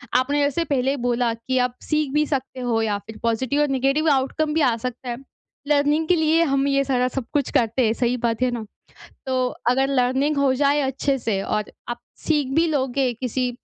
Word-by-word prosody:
आपने 285 +3 +2
जैसे 285 +4 +1
पहले 275 -2 0
बोला 240 -1 0
कि 230 +3 -3
आप 250 0 -2
सीख 305 -3 -1
भी 300 0 +3
सकते 265 -2 -3
हो 235 -2 0
या 210 -2 0
फिर 220 +1 -11
पॉज़िटिव 255 +5 0
और 295 - +3
नेगेटिव 275 +4 +1
आउटकम 290 +3 +1
भी 320 - +1
आ 245 -4 +3
सकता 250 +1 -6
है। 240 - -3 0.5
लर्निंग 295 +2 +2
के 360 - +4
लिए 320 +1 +3
हम 275 0 +2
ये 275 0 +2
सारा 255 -2 +1
सब 255 -1 -4
कुछ 285 -3 +1
करते 235 +2 +2
हैं, 220 - +2
सही 240 +1 0
बात 230 -1 -1
है 255 - +3
ना। 235 -2 -4 0.6
तो 255 -1 0 0.2
अगर 265 +2 +2
लर्निंग 270 +3 +1
हो 275 -2 +3
जाए 285 +2 +2
अच्छे 270 +1 0
से 215 -5 -1
और 210 +1 -2 0.2
आप 240 - -4 0.3
सीख 295 -4 +1
भी 330 +1 +3
लोगे, 265 -4 0
किसी 250 +1 -2
265 Hz, 205 wpm, -22 LUFS, 245-285 Hz, 0.6 s, के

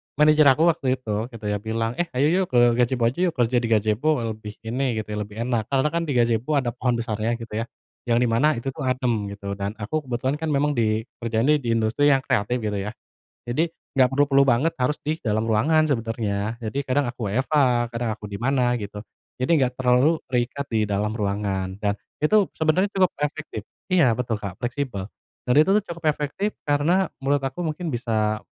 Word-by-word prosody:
manajer 150 0 +5
aku, 135 +4 +5
waktu 160 -4 -5
itu, 125 -4 -7 0.2
gitu, 110 -2 -9
ya, 105 - -1
bilang, 115 +2 -2
"Eh, 175 - +1
ayo 135 +3 +3
yuk, 185 +1 +2
ke 125 - +4 0.2
gajebo 125 0 +2
aja 130 - -10
yuk, 170 - -3
kerja 120 -1 +1
di 120 - -2
gajebo, 110 +5 +1 0.2
lebih 105 -1 -8
ini," 125 +2 -1
gitu - - -31
ya, - - -4
"lebih 105 0 -6
enak." 120 -3 -1
Karena 135 +1 +1
kan, 170 +1 -1
di 145 - -1
gazebo 120 +4 +2
ada 120 -3 -2
pohon 125 0 -1
besarnya 115 0 -1
gitu, 115 -2 -5
ya. 115 - -3 0.4
Yang 120 0 +3
di - - +2
mana 120 +7 +3
itu, 125 +3 -3
tuh, 140 -1 -5
adem 120 -5 0
gitu, 100 -1 -6
dan 100 +1 -4
aku 110 +8 -2
kebetulan 130 +3 -1
kan, 160 - -3
memang 145 +1 +2
di, 110 -2 +1 0.2
kerjanya 115 +6 +2
di 120 -4 -2
industri 115 +6 +2
yang 135 - +4
kreatif 105 +2 0
gitu, 105 -2 -1
ya. - - -3 0.6
Jadi, 155 +8 +1 0.2
gak 130 -2 +4
perlu-perlu 140 +1 +3
banget 130 +7 +3
harus 125 +4 +1
di 155 +2 -2
dalam 110 -1 0
ruangan, 145 +9 +3
sebenarnya, 115 -5 -2
jadi, 110 +5 -3
kadang 140 +1 0
aku 120 -4 -4
WFH, 130 +9 -2 0.4
kadang 120 0 -2
aku 105 - -15
di 100 -1 -6
mana, 125 -1 +2
gitu. 105 +1 -7 0.3
Jadi 145 +5 +2
gak 125 -1 0
terlalu, 130 +5 +3 0.2
terikat 125 +3 -1
di 110 -2 +1
dalam 105 +1 -1
ruangan. 100 -3 -2
Dan 100 0 0 0.3
itu, 205 +4 +4
sebenarnya 160 +5 +2
cukup 190 -3 +2
efektif 145 -7 -4 0.2
iya, 140 -11 +4
betul 115 -3 -2
Kak, 100 -3 -6
fleksibel. 120 -5 -3 0.4
Dan, 125 - +2
itu 155 - +3
tuh 210 - +2
cukup 170 0 -12
efektif, 150 +8 -2
karena 160 +6 +2
menurut 140 +1 +1
aku 135 +5 -4
mungkin 165 -1 -3
bisa, 110 -3 0
125 Hz, 200 wpm, -24 LUFS, 110-145 Hz, 0.6 s, manajer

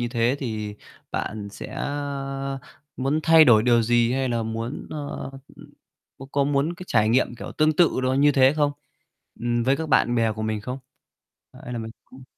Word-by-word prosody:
như 120 - -1
thế, 120 +2 +1
thì 110 -5 -4 0.4
bạn 105 -1 -4
sẽ, - - -8
a, 135 -1 -4 0.4
muốn 135 +4 0
thay 160 -1 +7
đổi 110 -5 +6
điều 120 -1 +4
gì 120 +1 +2
hay 135 -1 0
là 115 -1 -1
muốn, 115 +3 -5
ơ, 145 -2 -5 0.3
ừm, - - -14 0.5
có 135 - -9
có 140 -1 +2
muốn 145 +4 0
cái 185 0 -10
trải 110 -2 +3
nghiệm 120 0 +2
kiểu 120 - -8
tương 155 0 +2
tự 170 -6 +3
đó 130 0 +1
như 145 +2 +4
thế 135 0 +5
không? 145 -1 +2 0.7
Ừm, 120 0 0
với 135 +3 +2
các 160 +1 -4
bạn 120 -3 +3
bè 115 -2 +2
của 110 +1 -6
mình 110 -1 -2
không? 125 +5 -5 0.9
Hay 125 - -6
là 120 - -3
mình 110 0 -6
cũng 130 +1 -15
130 Hz, 200 wpm, -24 LUFS, 115-140 Hz, 0.9 s, thay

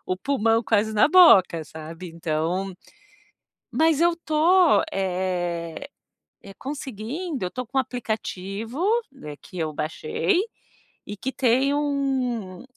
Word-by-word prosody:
o 185 - -1
pulmão 230 -1 +1
quase 220 +1 +1
na 215 - +5
boca, 195 - +6
sabe, 160 +4 -9
então 165 +3 -2 1.0
Mas 320 -1 +2
eu 345 0 +4
estou, 335 - +3
eh 180 -3 -2 0.5
eh, 195 - -12
conseguindo, 275 - -5
eu 180 - -2
estou 250 +4 -5
com 270 - -4
um 265 - +5
aplicativo, 225 - -5 0.6
que 185 - -12
eu 155 -2 -2
baixei, 390 - -1 0.7
e 205 0 -6
que 265 +6 -3
tem 265 +3 +2
um 265 -8 -1
225 Hz, 120 wpm, -24 LUFS, 185-280 Hz, 1.0 s, boca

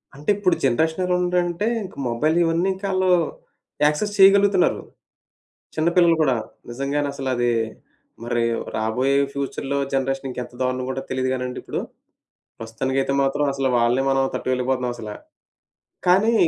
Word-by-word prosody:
అంటే 145 +5 -7
ఇప్పుడు 195 -3 +2
జనరేషన్ 160 +7 +1
ఎలా 180 - +1
ఉందంటే, 175 +1 0 0.2
ఇంక 185 - -10
మొబైల్ 155 +8 +1
ఇవన్నీ 165 +2 +1
ఇంకా 195 +2 -8
ఆళ్ళు 185 0 +1 0.8
యాక్సెస్ 205 +8 +1
చేయగలుగుతున్నారు. 195 -1 +5 1.0
చిన్న 160 +2 +2
పిల్లలు 170 -2 +5
గూడా. 135 -5 +3 0.3
నిజంగానే 140 +4 -2
అసలది 130 -3 0 0.7
మరి 120 0 0 0.3
రాబోయే 125 +5 0 0.2
ఫ్యూచర్‌లో 140 0 -3 0.2
జనరేషన్ 135 0 -1
ఇంకెంత 125 -1 -6
దారుణంగుంటదొ 130 +1 -2
తెలీదు 130 0 0
గానండి 125 -1 -4
ఇప్పుడు. - - -4 0.8
ప్రస్తుతానికైతే 130 +5 -2
మాత్రం 135 +2 0
అసలు 135 -1 0
వాళ్ళనే 120 +3 +2
మనం 135 0 +2
తట్టుకోలేక‌పోతున్నాం 125 -1 -1
అసలా. 105 -3 -7 0.9
కానీ 195 +6 +4
135 Hz, 125 wpm, -22 LUFS, 125-170 Hz, 1.0 s, చేయగలుగుతున్నారు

